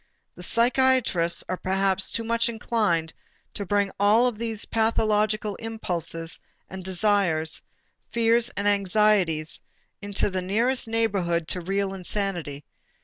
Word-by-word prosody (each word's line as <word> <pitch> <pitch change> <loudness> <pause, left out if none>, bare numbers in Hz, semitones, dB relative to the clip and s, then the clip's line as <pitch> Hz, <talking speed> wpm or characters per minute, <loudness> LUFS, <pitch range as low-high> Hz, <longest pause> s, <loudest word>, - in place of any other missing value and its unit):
The - - -12
psychiatrists 230 -6 +2
are 185 - -2
perhaps 190 0 +1
too 230 - -1
much 230 +1 +1
inclined 210 -8 -1 0.4
to 200 - -5
bring 200 0 +1
all 220 +5 +4
these 225 -1 -4
pathological 215 -2 +1
impulses 175 -7 -3 0.3
and 190 0 -8
desires, 180 -4 +1 0.5
fears 235 +1 +3
and 200 0 0
anxieties, 195 -5 +2 0.4
into 200 0 -1
the 185 0 -2
nearest 230 +7 +1
neighborhood 195 -8 0
to 180 - 0
real 195 +2 -1
insanity. 180 -6 -3
200 Hz, 115 wpm, -25 LUFS, 180-225 Hz, 0.5 s, all